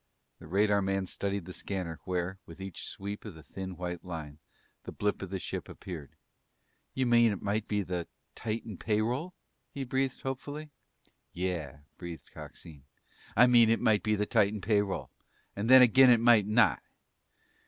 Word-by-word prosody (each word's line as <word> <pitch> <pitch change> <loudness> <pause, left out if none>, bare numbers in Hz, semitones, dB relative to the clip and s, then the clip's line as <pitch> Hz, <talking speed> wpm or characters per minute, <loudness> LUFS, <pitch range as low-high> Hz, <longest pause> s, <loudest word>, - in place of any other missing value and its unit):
The - - -12
radarman 95 +1 +1
studied 100 -2 -3
the 90 - -8
scanner, 90 -5 -4
where, 90 +1 -2
with 85 +2 -12
each 95 -2 -6
sweep 100 +1 -6
of 105 -6 -8
the 80 - -13
thin 95 0 -7
white 90 -1 -5
line, 80 -4 -7 0.4
the - - -7
blip 105 0 -1
of 95 - -5
the 95 - -3
ship - - -5
appeared. 80 -7 -9 0.8
"You 130 - +1
mean 120 -2 +5
it 100 - -5
might 105 +1 -1
be 105 -1 0
the 90 -2 -4 0.3
Titan 110 -2 -4
pay 105 -1 +1
roll?" 135 +11 -3 0.3
he 140 - -5
breathed 130 +1 -1
hopefully. 145 +3 -5 0.6
"Yeah," 80 -6 -3 0.2
breathed 85 -2 -8
Coxine. 75 -5 -11 0.5
"I 125 - +9
mean 120 -2 +6
it 115 - +3
might 105 -2 +3
be 110 -1 +1
the 105 0 0
Titan 105 -1 +2
pay 100 +1 +2
roll, 100 -2 -4 0.4
and 105 +4 -2
then 130 0 +10
again 130 +2 +7
it 120 -2 +6
might 115 -3 +5
not!" 105 - +4
100 Hz, 170 wpm, -30 LUFS, 90-115 Hz, 0.8 s, then